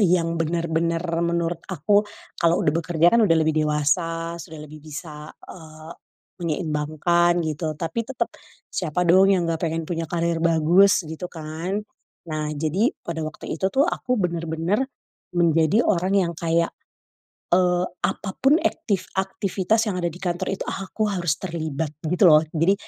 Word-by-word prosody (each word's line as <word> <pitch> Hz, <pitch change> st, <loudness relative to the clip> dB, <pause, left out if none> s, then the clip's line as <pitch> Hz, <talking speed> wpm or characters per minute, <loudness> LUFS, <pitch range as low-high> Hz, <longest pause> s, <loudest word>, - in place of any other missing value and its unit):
yang 170 Hz, -3 st, +2 dB
bener-bener 165 Hz, 0 st, 0 dB, 0.2 s
menurut 170 Hz, 0 st, -1 dB
aku 205 Hz, +7 st, +2 dB, 0.3 s
kalo 170 Hz, 0 st, +2 dB
udah 150 Hz, -, +2 dB
bekerja 170 Hz, +1 st, +3 dB
kan 235 Hz, -, +5 dB
udah 165 Hz, -4 st, +4 dB
lebih 160 Hz, 0 st, +2 dB
dewasa 165 Hz, +3 st, 0 dB
sudah 160 Hz, -2 st, -9 dB
lebih 150 Hz, 0 st, -11 dB
bisa, 150 Hz, 0 st, -8 dB, 0.2 s
eee, 155 Hz, -2 st, -11 dB, 0.5 s
menyeimbangkan 170 Hz, +2 st, +1 dB
gitu 155 Hz, +1 st, -2 dB
tapi 170 Hz, +8 st, -2 dB
tetep, 265 Hz, +2 st, -2 dB, 0.4 s
siapa 175 Hz, 0 st, -1 dB
dong 190 Hz, +3 st, +6 dB
yang 175 Hz, -3 st, +1 dB
gak 165 Hz, +1 st, -1 dB
pengen 165 Hz, 0 st, -2 dB
punya 165 Hz, -1 st, -2 dB
karir 170 Hz, 0 st, -1 dB
bagus 170 Hz, +4 st, +5 dB
gitu 160 Hz, +3 st, -6 dB
kan, 165 Hz, +5 st, -4 dB, 0.5 s
nah 155 Hz, -1 st, -2 dB
jadi 165 Hz, -, 0 dB
pada 165 Hz, -1 st, -5 dB
waktu 155 Hz, -, -7 dB
itu 190 Hz, +3 st, 0 dB
tuh 275 Hz, +2 st, +4 dB
aku 250 Hz, -7 st, -1 dB
bener-bener, 170 Hz, +6 st, -1 dB, 0.5 s
menjadi 165 Hz, +5 st, +3 dB
orang 185 Hz, 0 st, +1 dB
yang 170 Hz, -3 st, +1 dB
kayak, 170 Hz, +1 st, 0 dB, 0.8 s
eee, 180 Hz, 0 st, +3 dB, 0.2 s
apapun 270 Hz, -, +1 dB
ektif 200 Hz, -, -1 dB
aktivitas 195 Hz, +3 st, 0 dB
yang 190 Hz, -, -1 dB
ada 170 Hz, -, 0 dB
di 175 Hz, -, -12 dB
kantor 175 Hz, 0 st, -2 dB
itu 195 Hz, -, -3 dB
aku 205 Hz, +2 st, -2 dB
harus 175 Hz, -5 st, 0 dB
terlibat 160 Hz, -4 st, -3 dB
gitu 180 Hz, +5 st, +2 dB
loh 155 Hz, 0 st, +7 dB
jadi, 165 Hz, +4 st, +3 dB
170 Hz, 145 wpm, -23 LUFS, 160-185 Hz, 0.8 s, loh